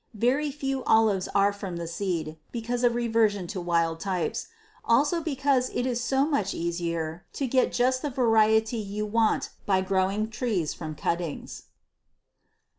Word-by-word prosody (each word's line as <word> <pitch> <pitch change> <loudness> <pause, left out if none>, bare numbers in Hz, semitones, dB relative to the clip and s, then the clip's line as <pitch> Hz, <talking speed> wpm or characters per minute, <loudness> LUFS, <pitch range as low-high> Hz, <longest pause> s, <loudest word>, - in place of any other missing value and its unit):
Very 270 +7 +2
few 270 -2 -3
olives 215 -4 +3
are 200 0 +4
from 195 -4 -6
the 170 - -4
seed, 165 -3 -3
because 240 +1 -3
of 240 -1 +3
reversion 225 -5 +1
to 185 +1 -5
wild 165 -2 +1
types 185 -1 -2 0.4
also 290 +8 +3
because 275 -4 +1
it 245 - -2
is 245 -2 -1
so 270 +3 +2
much 250 -11 0
easier 170 -1 -3
to 275 - -2
get 255 0 +2
just 255 +1 +1
the 295 - -2
variety 225 -2 +3
you 210 0 -3
want 220 +1 +1 0.2
by 190 -2 +3
growing 195 +3 0
trees 215 - -1
from 155 -2 -6
cuttings. 170 0 -3
215 Hz, 150 wpm, -27 LUFS, 180-245 Hz, 0.4 s, are